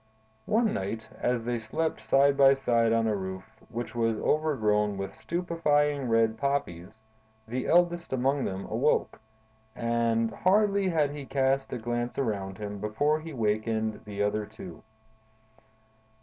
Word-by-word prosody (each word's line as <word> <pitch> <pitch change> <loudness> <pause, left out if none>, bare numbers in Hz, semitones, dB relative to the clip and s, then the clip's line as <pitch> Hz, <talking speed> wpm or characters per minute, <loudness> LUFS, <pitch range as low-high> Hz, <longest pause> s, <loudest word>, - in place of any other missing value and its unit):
"One 225 0 +2
night, 110 +4 -4
as 120 -2 0
they 120 0 -1
slept 155 +9 -2
side 140 +1 +4
by 135 0 +6
side 115 -4 +2
on 115 0 +2
a 110 -1 +1
roof, 95 -1 -7
which 120 +1 -5
was 115 -2 0
overgrown 105 -11 +1
with 95 0 -5
stupefying 150 -6 0
red 115 -1 +2
poppies, 110 -7 -3 0.4
the 125 +3 -3
eldest 175 0 +2
among 135 +2 +1
them 95 0 -4
awoke; - - 0 0.5
and 115 -1 0
hardly 200 - +2
had 155 -4 +1
he 145 -2 -7
cast 135 0 +1
a - - -2
glance 120 +1 -3
around 100 -7 -2
him, 105 -1 -6
before 145 +9 0
he 160 +1 -8
wakened 110 -2 -1
the 105 -1 -3
other 105 +1 0
two. 85 -3 -10
120 Hz, 140 wpm, -28 LUFS, 110-145 Hz, 0.5 s, by